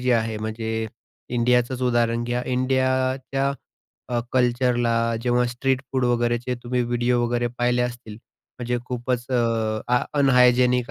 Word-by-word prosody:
जी 125 0 0
आहे 110 -1 0
म्हणजे 110 +1 -3 0.4
इंडियाचंच 125 +1 +1
उदाहरण 120 -1 +1
घ्या. 120 +1 -2
इंडियाच्या 130 +1 0 0.6
अ, 120 -1 0
कल्चरला 120 -2 +2 0.3
जेव्हा 125 0 +2
स्ट्रीट 130 +2 -1
फूड 130 -1 +1
वगैरेचे 120 +1 0
तुम्ही 125 +1 -1
व्हिडिओ 120 0 +1
वगैरे 120 0 0
पाहिले 125 0 +2
असतील. 120 -3 -5 0.4
म्हणजे 120 0 -1
खूपच 125 -1 -2
अ, 115 -3 0
आ 125 0 +3 0.2
अनहायजेनिक 125 -2 +4
125 Hz, 125 wpm, -23 LUFS, 120-125 Hz, 0.6 s, अनहायजेनिक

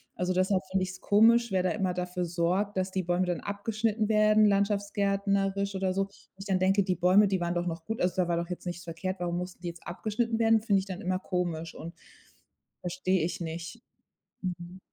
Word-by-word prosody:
Also, 180 0 -1
deshalb 185 +1 +2
finde 190 -1 +1
ich's 185 0 -6
komisch, 230 +2 +5
wer 185 - +2
da 185 - +1
immer 190 -3 -1
dafür 180 0 -3
sorgt, 180 +4 0
dass 185 0 0
die 185 -1 -1
Bäume 175 +1 +1
dann 175 -1 -2
abgeschnitten 215 +1 -1
werden, 215 0 +5
landschaftsgärtnerisch 200 -1 +1
oder 190 -1 0
so. 195 +1 +1
Wo 195 -1 -22
ich 195 - -7
dann 190 -2 +1
denke: 195 +2 +3
„Die 185 -1 0
Bäume, 185 +4 +5
die 190 -2 0
waren 175 0 0
doch 175 0 -1
noch 165 -1 -4
gut, 225 +4 -4
also 180 0 +1
da 180 -2 +1
war 170 - +1
doch 170 +1 -3
jetzt 180 - -6
nichts 175 -1 -5
verkehrt. 185 +3 -4
Warum 175 -1 -2
mussten 180 0 -7
die 175 - -5
jetzt 170 0 -8
abgeschnitten 225 +6 -2
werden?" 225 -1 +4
Finde 205 -3 +2
ich 190 - -5
dann 190 +1 -6
immer 185 0 -1
komisch 170 -3 -3
und 165 +2 -8 0.9
verstehe 185 -1 0
ich 180 +3 -4
nicht. 170 +7 -6 0.6
Mhm. 180 0 -5
185 Hz, 215 wpm, -29 LUFS, 175-200 Hz, 0.9 s, komisch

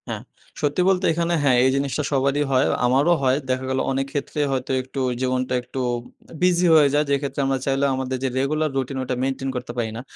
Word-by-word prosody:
হ্যাঁ, - - -4 0.4
সত্যি 145 +4 +1
বলতে 190 0 +2
এখানে 170 +1 0
হ্যাঁ, 130 -3 +4
এই 130 - +4
জিনিসটা 140 +2 -1
সবারই 140 +1 +1
হয়। 130 0 +3 0.2
আমারও 135 +7 +3
হয়। 130 0 +3
দেখা 130 0 -1
গেল 130 0 0
অনেক 135 0 0
ক্ষেত্রে 145 +1 -4
হয়তো 130 -1 -2
একটু 130 +2 -7 0.2
জীবনটা 130 0 -1
একটু 125 +2 -7 0.6
বিজি 180 0 +3
হয়ে 150 -3 +6
যায়। 150 +1 +2
যেক্ষেত্রে 140 0 -1
আমরা 135 -1 0
চাইলেও 135 +1 +1
আমাদের 130 0 -3
যে 135 - +1
রেগুলার 155 +3 0
রুটিন 135 0 -2
ওইটা 130 0 -2
মেইনটেইন 135 0 -2
করতে 125 -1 -4
পারি 115 -2 -1
না। - - -5
135 Hz, 200 wpm, -22 LUFS, 130-145 Hz, 0.6 s, হয়ে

